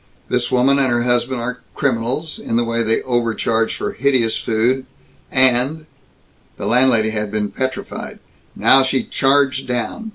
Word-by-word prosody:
This 125 0 -1
woman 130 +2 +3
and 135 -1 +2
her 120 0 +1
husband 120 0 0
are 125 +1 -4 0.2
criminals, 135 +4 -2
in 115 - -4
the 120 - +2
way 115 0 -1
they 110 0 0
overcharge 115 -2 -1
for - - -4
hideous 125 -3 +1
food 125 +4 -1 0.4
and 130 +4 +3 0.4
" - - -37
The - - -6
landlady 120 -3 +3
had 105 -1 -3
been 105 0 -3
petrified. 130 0 -5 0.4
Now 135 - +6
she 130 0 0
charged 135 -1 +1
down. 125 - -3
125 Hz, 155 wpm, -18 LUFS, 115-130 Hz, 0.4 s, Now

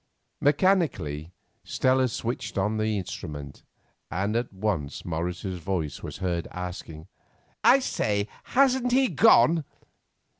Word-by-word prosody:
Mechanically 140 - +1 0.3
Stella 130 0 +2
switched 115 -3 -4
on 105 +3 +1
the 110 -1 0
instrument, 75 -6 -6 0.5
and 100 +5 -1
at 120 +1 -1
once 95 -8 -3
Morris's 90 +3 -3
voice 85 -4 -3
was - - -7
heard 90 -3 -2
asking: 90 -3 -7 0.6
"I 265 - +7
say, 105 - -1 0.2
hasn't 255 -2 +3
he 260 -1 +4
gone?" 155 +1 +5
100 Hz, 110 wpm, -26 LUFS, 85-130 Hz, 0.6 s, I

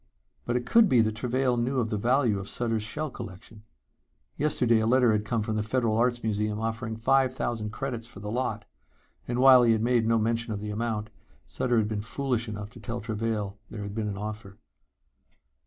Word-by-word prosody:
But 120 - -1
it 125 0 -1
could 225 - +5
be 125 - +4
that 110 -1 +1
Travail 125 +2 0
knew 125 +3 0
of 115 -2 -1
the - - 0
value 120 -2 +2
of 95 - -5
Sutter's 115 -2 -1
shell 150 +8 -4
collection. 110 -1 -10 0.7
Yesterday 125 -6 +2
a 110 - +1
letter 125 -1 +4
had 105 0 0
come 115 -1 -1
from 110 0 -2
the - - +1
Federal 110 0 0
Arts 120 +1 +1
Museum 105 -1 -1
offering 115 0 -3
five 130 +3 +3
thousand 115 -4 -2
credits 115 0 -4
for 120 -5 -12
the 105 +1 -5
lot, 125 +3 -2 0.6
and 120 - -2
while 130 0 +8
he 115 -2 +5
had 110 0 0
made 120 -2 +2
no 115 0 +3
mention 115 +1 0
of 100 - -4
the 105 0 -5
amount, 110 -1 -3 0.3
Sutter 125 -2 -1
had 110 -2 +2
been 105 -1 -2
foolish 120 0 -2
enough 105 0 -6
to 120 - -12
tell 115 +3 -5
Travail 110 -2 -3
there 105 -2 -6
had 100 0 -6
been 110 0 -2
an 100 -1 -4
offer. 105 -1 -7
115 Hz, 205 wpm, -27 LUFS, 105-125 Hz, 0.7 s, while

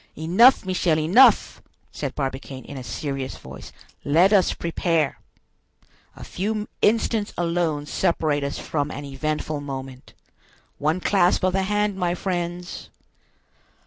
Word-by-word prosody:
"Enough, 185 - +5
Michel, 180 -4 +1
enough!" 180 +12 +4 0.3
said - - -5
Barbicane, 135 -1 -5
in 145 - -9
a 130 - -6
serious 135 +2 -4
voice; 65 +1 -11 0.3
"let 170 +8 +4
us 195 -3 +4
prepare. 165 -3 -1 1.0
A - - -11
few 210 +3 -3
instants 220 -1 +1
alone 170 -4 -1
separate 155 -3 0
us 140 - -3
from 145 -2 -2
an 145 0 -7
eventful 150 +2 -3
moment. 135 -2 -8 0.7
One 155 +5 0
clasp 185 -2 +2
of 185 -1 +2
the 195 - +1
hand, 205 0 0
my 175 -1 0
friends." 175 -1 -4
165 Hz, 125 wpm, -23 LUFS, 145-185 Hz, 1.0 s, Enough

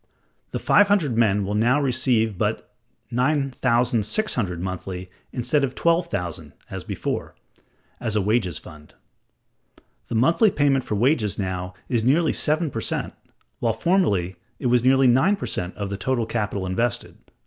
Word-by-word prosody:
(165) - - -42
The - - -5
five 205 -1 +6
hundred 175 - +2
men 105 -3 +2
will 100 - -3
now 120 +6 +3
receive 120 -5 +1
but - - -2 0.4
$9,600 125 - +1
monthly 95 0 -5 0.2
instead 130 +4 0
of 130 -2 -1
$12,000, 165 - -1 0.2
as - - -5
before, - - -4 0.6
as 115 -3 -3
a 105 - +2
wages 100 -6 +1
fund; 75 -2 -13 1.1
the - - -4
monthly 165 - +4
payment 140 -6 +2
for 105 - -3
wages 110 -3 +1
now 90 -2 -4
is 120 -3 0
nearly 150 +6 +3
seven 155 0 0
per 115 - -4
cent, - - -3 0.5
while 115 -1 +1
formerly 110 - +1 0.2
it - - -8
was 120 -1 +3
nearly 135 +1 +4
nine 135 +11 +4
per 200 - -6
cent 90 +1 -4
of 100 -1 -4
the 100 - -3
total 120 +3 -1
capital 105 -4 -2
invested 105 +5 -2
($140,000). - - -28
120 Hz, 155 wpm, -23 LUFS, 100-135 Hz, 1.1 s, five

